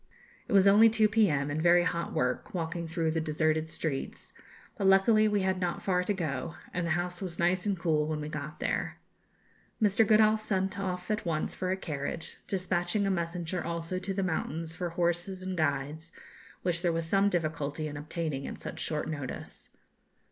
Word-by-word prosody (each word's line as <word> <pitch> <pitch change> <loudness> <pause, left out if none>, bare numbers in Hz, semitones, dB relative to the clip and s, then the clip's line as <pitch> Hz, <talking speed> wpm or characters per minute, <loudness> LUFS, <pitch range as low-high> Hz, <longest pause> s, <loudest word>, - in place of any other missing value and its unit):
It - - -3
was 195 0 +6
only 215 +3 +8
2 220 -1 +3
p.m., 160 -10 +2
and 155 +2 -1
very 175 +1 +5
hot 170 -1 -1
work, 125 +8 -1
walking 170 0 -3
through 165 -1 0
the 160 0 0
deserted 155 0 0
streets, 145 -4 -4 0.4
but 195 - 0
luckily 215 +3 +5
we 205 -1 +1
had 190 -1 0
not 175 -1 -2
far 180 -2 +2
to - - 0
go, 160 -4 -3 0.2
and 175 -1 -1
the 160 0 +2
house 175 +1 -3
was 180 -3 -4
nice 180 +3 +1
and 200 -2 +1
cool 155 -3 +1
when 155 -1 -2
we 150 - -4
got 150 0 -6
there. - - -2 0.8
Mr. 210 0 +4
Goodall 215 0 +5
sent 195 -2 -1
off 180 0 -3
at 215 - -1
once 160 -3 -1
for 185 - -3
a 190 - 0
carriage, 150 -2 -5
despatching 185 +1 0
a 195 - +1
messenger 170 0 -2
also 170 +2 -3
to 190 +1 -4
the 195 0 -1
mountains 165 -2 -2
for 175 -2 -3
horses 175 +2 -1
and 185 0 -3
guides, 155 +1 -1 0.5
which 170 -2 0
there 175 -2 +2
was 165 0 -1
some 195 +4 +3
difficulty 155 -3 -2
in 145 - -6
obtaining 150 -2 -3
at - - -7
such - - -6
short 150 -1 -2
notice. 145 -5 -6
175 Hz, 190 wpm, -30 LUFS, 160-190 Hz, 0.8 s, only